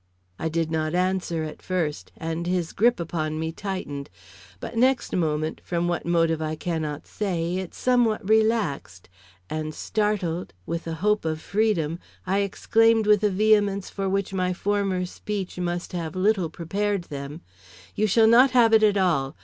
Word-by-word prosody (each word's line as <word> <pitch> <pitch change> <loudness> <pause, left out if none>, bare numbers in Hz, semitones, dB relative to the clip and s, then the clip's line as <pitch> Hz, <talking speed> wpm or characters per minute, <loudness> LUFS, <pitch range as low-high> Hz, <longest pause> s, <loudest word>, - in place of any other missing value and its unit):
I 160 - -1
did 160 0 -1
not 155 +1 -1
answer 180 -3 0
at 155 -1 -7
first, 170 -5 -2
and 165 +1 -3
his 180 -2 -1
grip 235 +1 +3
upon 155 -2 -2
me 160 0 -2
tightened; 165 -7 -5 0.5
but - - -7
next 255 +2 +2
moment, 155 -2 -1
from 175 0 -1
what 175 -1 -2
motive 165 -2 +2
I 155 0 -2
cannot 155 -3 -3
say, 180 -4 -2
it 190 -2 -5
somewhat 240 -5 +1
relaxed; 215 - +1 0.4
and, 155 -1 -4
startled, 200 - -1
with 170 0 -4
the 165 -1 -3
hope 210 0 +3
of 155 -1 -2
freedom, 175 -5 0 0.3
I 190 +2 +1
exclaimed 225 +3 +3
with 210 0 +4
a 210 - +4
vehemence 205 -1 +2
for 195 -1 -2
which 195 0 -1
my 185 -1 0
former 195 -1 0
speech 190 0 -5
must 175 0 -3
have 170 -1 -4
little 190 -2 +2
prepared 200 +4 -2
them: 145 +1 -7 0.5
"You 215 +1 +1
shall 220 +3 +4
not 245 +4 +7
have 230 -2 +5
it 220 - +7
at 210 -2 +4
all. 160 -8 +1
180 Hz, 165 wpm, -25 LUFS, 160-210 Hz, 0.5 s, not